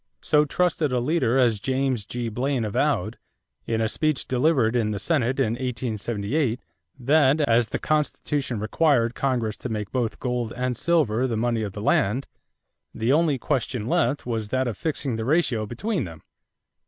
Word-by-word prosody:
So 150 -1 +4
trusted 165 -2 0
a 125 - +1
leader 130 -2 +1
as 120 -5 +3
James 130 -2 -1
G. 120 -1 -3
Blaine 125 +2 -1
avowed, 105 - 0 0.5
in 115 -1 0
a 110 - +2
speech 155 +4 0
delivered 130 -3 +2
in 115 -3 +1
the 105 - -2
Senate 130 +1 0
in 125 -5 +2
1878, 120 +1 -2 0.4
that, 140 +2 +3
as 120 -4 +3
the - - -3
Constitution 145 -5 -1
required 120 +1 +2
Congress 120 -6 -1
to 125 - -5
make 105 -3 -4
both 120 -4 -2
gold 125 -3 -2
and 125 0 -1
silver 130 -6 +1
the 115 -3 -2
money 115 0 0
of 100 -3 -4
the 105 - -6
land, 115 +5 +2 0.7
the 115 +4 +1
only 155 -2 +3
question 125 -4 -2
left 150 0 +1
was 115 -3 -3
that 130 +1 0
of 115 - -2
fixing 140 - -2
the 110 - -3
ratio 130 -7 +1
between 180 - -2
them. 80 -3 -11
125 Hz, 165 wpm, -24 LUFS, 110-140 Hz, 0.7 s, So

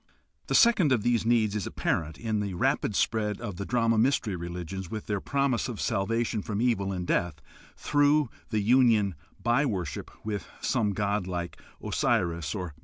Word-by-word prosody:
The - - 0
second 220 - +5
of 120 -5 +2
these 120 -2 +1
needs 110 -3 +2
is 105 - -2
apparent 80 0 -2
in 110 -2 -2
the 100 -3 -3
rapid 100 +3 0
spread 105 -1 0
of 95 -4 -6
the 100 - -5
drama 115 -2 +2
mystery 120 -4 +1
religions 85 +1 -6
with 110 +1 -5
their 100 -2 -2
promise 140 -3 0
of 115 -5 -6
salvation 115 +2 0
from 105 0 -3
evil 110 -5 +1
and 90 -2 -3
death 85 -3 0 0.4
through 145 -2 +2 0.2
the 110 -2 0
union 110 -3 +4 0.3
by 120 +4 +2
worship 95 - -3 0.2
with 105 -2 -3
some 110 -6 0
god 100 -1 -1
like 85 -1 -5 0.2
Osiris 85 -2 0
or 95 -3 -3
Mithra. 75 0 -18
105 Hz, 175 wpm, -28 LUFS, 95-120 Hz, 0.4 s, second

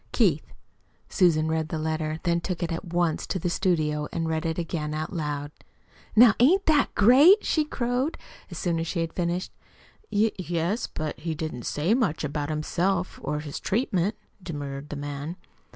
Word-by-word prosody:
KEITH - - +1 0.5
Susan 160 -5 +3
read 160 0 -1
this 160 - -3
letter, 155 0 -2
then 170 -1 +1
took 180 0 -3
it 170 - -2
at 165 - -4
once 175 -2 0
to - - -1
the 175 0 -2
studio 155 -6 0
and 165 -1 -2
read 160 +1 -1
it 160 - -2
again 155 -3 -3
aloud. 150 -3 -3 0.6
"Now 225 -1 +8
ain't 350 +11 +5
that 300 -3 +3
great?" 280 - +7
she 310 - +2
crowed, 255 +2 -1 0.3
as - - -7
soon 170 -2 0
as 165 - -2
she 170 - -1
had 165 -1 -3
finished. 175 +1 -2 0.6
"Y 215 +2 +3
yes, 175 +5 -1
but 155 -1 -5
he 165 -1 -3
didn't 155 -6 -5
say 160 +8 +1
much 225 - 0
about 145 0 -2
himself 175 +4 -1
or 150 0 -2
his 150 -2 -6
treatment," 205 -2 0 0.3
demurred 145 -4 -6
the - - -5
man. 145 +3 -5
165 Hz, 170 wpm, -26 LUFS, 155-190 Hz, 0.6 s, Now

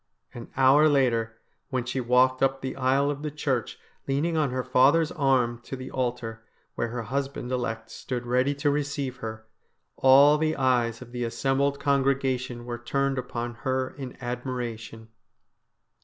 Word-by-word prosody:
An 120 -1 -9
hour 135 +4 +6
later, 115 -5 +1 0.3
when 130 -3 -2
she 130 +1 -2
walked 125 +1 +3
up 135 0 +1
the 130 - -4
aisle 135 +2 +2
of 145 0 -6
the 155 - -3
church 140 -5 -2 0.3
leaning 145 +5 0
on 155 -3 +2
her 130 0 -2
father's 140 +6 +4
arm 130 -5 +1
to - - -5
the 130 0 -8
altar, 120 -3 -3 0.3
where 120 - -2
her 120 0 -4
husband 135 +1 -3
elect 115 -3 -3
stood 125 -1 -5
ready 125 +4 +1
to 145 +1 +1
receive 140 -2 -2
her, 110 -2 -7 0.5
all 140 +3 +6
the 155 0 +1
eyes 125 -3 +1
of 120 - -16
the 120 0 -3
assembled 135 +4 0
congregation 135 -3 0
were 120 -1 -5
turned 135 +2 -1
upon 120 -1 -4
her 130 0 -1
in 135 -3 -8
admiration. 120 -3 -5
130 Hz, 155 wpm, -26 LUFS, 120-140 Hz, 0.5 s, hour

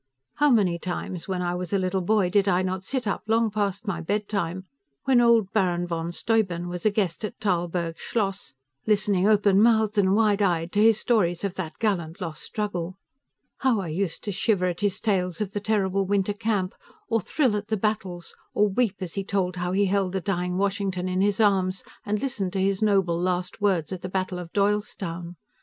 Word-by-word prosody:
How 295 - +4
many 195 -9 +3
times, 175 0 -5
when 185 -2 -2
I 175 0 -1
was 180 -1 -4
a - - +4
little 190 0 0
boy, 190 -1 +2
did 200 0 +3
I 185 -1 +3
not 185 0 -2
sit 255 +4 -3
up 200 - -1
long 225 0 +2
past 205 0 -1
my 180 -5 -2
bedtime, 195 -1 -2 0.4
when 255 -3 +4
old 230 -4 +4
Baron 180 -4 +1
von 170 -1 -3
Steuben 180 -4 0
was 180 +3 -1
a - - +6
guest 200 -3 -1
at 215 +2 -5
Tarlburg 175 -3 -1
Schloss, 200 -3 -2 0.4
listening 205 -2 +2
open 205 -2 +4
mouthed 220 -2 +3
and 190 0 +3
wide 210 -2 +3
eyed 170 -3 +1
to 205 - +2
his 220 -1 +5
stories 180 -8 +1
of 200 -3 -1
that 175 -4 -6
gallant 175 -7 -1
lost 165 -4 -5
struggle! 185 -4 -4 0.6
How 255 -5 +2
I 185 -4 -4
used 170 +1 -2
to 205 - -3
shiver 195 0 +1
at 175 -1 -2
his 200 -2 0
tales 180 -5 0
of 205 -2 -3
the 205 - -1
terrible 195 -2 0
winter 200 0 +1
camp, 205 -3 -1 0.3
or 225 -2 +1
thrill 255 - +1
at 205 0 -3
the 220 -1 0
battles, 190 -4 -2 0.2
or 210 0 +4
weep 210 0 +1
as 180 -3 -5
he 195 - -2
told 190 -2 -1
how 180 0 -2
he 200 +2 +2
held 195 -1 0
the 190 - 0
dying 180 -1 -1
Washington 195 -2 -1
in 185 0 0
his 200 0 +1
arms, 190 -3 +2 0.2
and 210 0 0
listened 205 -8 -2
to 195 - -1
his 195 +1 +1
noble 190 -5 +2
last 180 +2 -2
words, 190 -6 +1
at 185 -2 -5
the 185 - -5
Battle 185 -1 -2
of 170 -2 -8
Doylestown! 195 -4 -1
195 Hz, 205 wpm, -25 LUFS, 180-210 Hz, 0.6 s, a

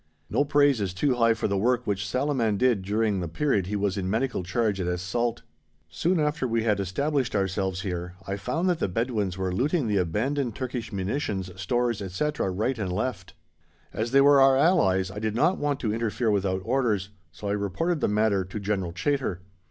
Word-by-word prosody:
No - - +3
praise 145 -4 +3
is 95 -2 -2
too 140 +6 +2
high 115 -2 +3
for 110 - -1
the 100 -1 0
work 125 +3 +1
which 100 0 -1
Salaman 125 -3 0
did 120 -3 +2
during 105 +1 0
the 85 - -3
period 100 - 0
he 105 - -2
was 100 -1 0
in 95 -1 -2
Medical 115 +2 0
charge 100 +2 0
at 90 - -2
Es 90 0 -1
Salt. 120 +5 -1 0.5
Soon 170 - 0
after 150 -3 0
we 115 -1 0
had 105 -3 +1
established 135 - -1
ourselves 95 -1 -1
here 90 -2 -4
I 100 - -2
found 165 - -2
that 175 -3 +1
the - - +1
Bedouins 105 -2 -1
were 95 -1 -2
looting 145 - +1
the 105 -2 +1
abandoned 115 - -1
Turkish 125 -2 -4
munitions, 95 -1 -2
stores, 120 +4 -1
etc., 100 +7 -1
right 110 +7 -1
and 95 -4 -2
left; 95 -1 -3 0.6
as 110 +2 -2
they 135 +3 +5
were 140 0 +6
our 135 0 +6
allies, 95 - +3
I 105 - -6
did 110 0 -2
not 170 +10 +2
want 145 -2 -1
to 110 -3 0
interfere 115 0 0
without 95 -2 0
orders, 115 -6 0 0.2
so 100 +6 -7
I - - 0
reported 105 - -1
the - - +2
matter 105 -2 +2
to 95 +4 -6
General 95 -4 -2
Chaytor. 110 -2 -1
110 Hz, 200 wpm, -26 LUFS, 95-130 Hz, 0.6 s, were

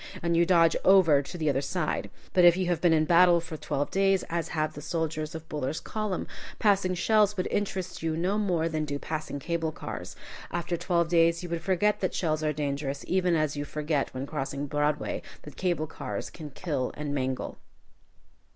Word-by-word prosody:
and 170 -1 +1
you 170 0 +4
dodge 165 -3 +5
over 180 -7 +6
to 145 +5 -8
the 155 -2 -1
other 135 -2 +2
side. 155 +3 -2 0.2
But 180 - +5
if 175 0 +7
you 185 - 0
had 175 -2 0
been 175 - +4
in 155 -1 +4
battle 175 +1 +6
for 165 -1 -7
twelve 145 -2 -2
days, 195 -1 +3
as 170 -1 -1
have 155 -1 -1
the 150 - -8
soldiers 155 -1 -3
of 160 0 -8
Buller's 150 0 -3
column, 215 -4 -3 0.3
passing 195 -3 +2
shells 210 +2 +3
would 185 - 0
interest 190 -3 -2
you 160 -1 -1
no 190 +5 0
more 175 -6 +1
than 155 -2 -1
do 145 -1 -3
passing 155 -1 -4
cable 165 +2 -2
cars. - - -7 0.3
After 175 0 -2
twelve 170 -1 0
days 170 0 +3
you 175 - -5
would 170 -1 -2
forget 190 +4 +1
that 185 - -1
shells 155 -3 0
are 155 - +2
dangerous 140 -1 -3
even 180 -2 +2
as 155 -2 0
you 145 - -2
forget 150 -1 -1
when 130 +1 -4
crossing 140 -1 -3
Broadway 145 0 -1 0.2
that 150 - -11
cable 175 -4 0
cars 155 - -6
can 155 -3 -8
kill 145 -3 -2
and 145 -1 -3
mangle. 130 -2 -3
165 Hz, 195 wpm, -28 LUFS, 150-180 Hz, 0.3 s, if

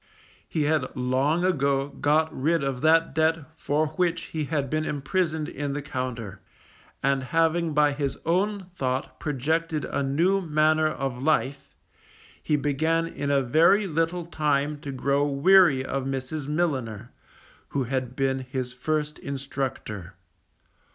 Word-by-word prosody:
He 155 - 0
had 150 -3 0
long 135 +7 +1
ago 140 -5 +1
got 155 +3 +1
rid 160 +3 +1
of 135 -2 -2
that 165 +1 +4
debt 160 -1 +1
for 155 0 0
which 170 +2 -1
he 155 -2 -1
had 145 -2 -1
been 155 +3 -1
imprisoned 155 +2 -1
in 145 0 -4
the 145 - -3
Compter, 125 -7 -5 0.6
and 135 0 +2
having 165 +2 +1
by 150 -1 +4
his 140 -1 -2
own 195 +4 0
thought 130 -4 -3
projected 155 +2 -1
a - - -2
new 170 +9 +2
manner 155 -1 +3
of 135 -4 -3
life, 140 -2 0 0.7
he 150 - +1
began 155 +3 +1
in 145 -3 -4
a 140 -1 +3
very 165 - +4
little 165 0 -1
time 150 -2 0
to 140 - -6
grow 140 +2 +1
weary 145 -1 +5
of 135 0 -2
Mrs. 135 +2 -4
Milliner, 130 -9 -2 0.6
who 140 - -1
had 130 0 -3
been 135 0 0
his 130 -1 -4
first 150 +3 -2
instructor. 130 -9 -5
145 Hz, 140 wpm, -26 LUFS, 135-160 Hz, 0.7 s, weary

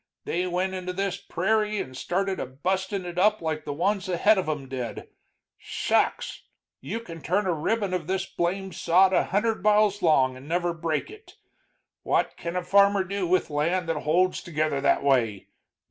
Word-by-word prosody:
They 180 +2 -1
went 180 +1 -1
into 180 -1 -4
this 195 0 -2
pe - - -24
rairie 210 +3 +1
and 130 -6 -5
started 190 +7 -1
a - - -3
bustin' 190 +8 -2
it 175 0 -4
up 210 +3 +4
like 155 -2 -3
the 145 - -3
ones 195 +5 0
ahead 195 +4 +4
of 180 - -2
'em 145 -3 -3
did. 125 -3 -6 0.5
Shucks! - - -1 0.4
you 195 +12 -4
can 165 -7 -10
turn 190 +7 0
a 180 - +1
ribbon 195 +5 -1
of 175 -4 -2
this 190 0 -1
blame 190 +2 -2
sod 185 +4 +4
a - - +3
hundred 220 +4 0
miles 210 -1 +3
long 135 -6 +3
and 130 +2 -12
never 175 +1 0
break 165 - -2
it. 430 +1 -15 0.7
What - - 0
can 170 +1 -5
a 180 - -1
farmer 200 +1 +4
do 195 0 -2
with 180 -2 +1
land 165 +4 0
that 160 -2 0
holds 180 +4 +2
together 155 -4 -1
that 140 - +2
way? 120 -8 +1
180 Hz, 185 wpm, -26 LUFS, 155-195 Hz, 0.7 s, up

